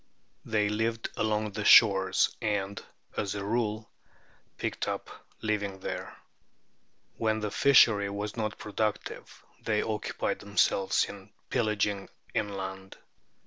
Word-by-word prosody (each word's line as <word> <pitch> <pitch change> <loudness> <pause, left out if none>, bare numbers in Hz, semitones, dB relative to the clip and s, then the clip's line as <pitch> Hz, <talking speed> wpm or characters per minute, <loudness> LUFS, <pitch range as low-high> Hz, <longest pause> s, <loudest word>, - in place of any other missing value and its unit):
They 105 -2 +1
lived 115 +2 -1
along 110 -1 0
the 105 +1 -4
shores, 95 -3 +6
and, 100 -1 -2 0.3
as 100 0 -2
a 100 -1 -4
rule, 110 0 -1 0.7
picked - - -3
up - - -3
a - - -15
living 105 -3 -1
there. - - -5 1.0
When 110 -1 +1
the 105 -1 -2
fishery 105 -6 +5
was 100 +1 -4
not 110 -2 -2
productive 105 0 -4 0.2
they 105 -2 +1
occupied 110 -1 -2
themselves 100 -1 +2
in 100 -1 -11 0.2
pillaging 105 -4 0 0.2
inland. 95 -2 -4
105 Hz, 115 wpm, -29 LUFS, 100-110 Hz, 1.0 s, shores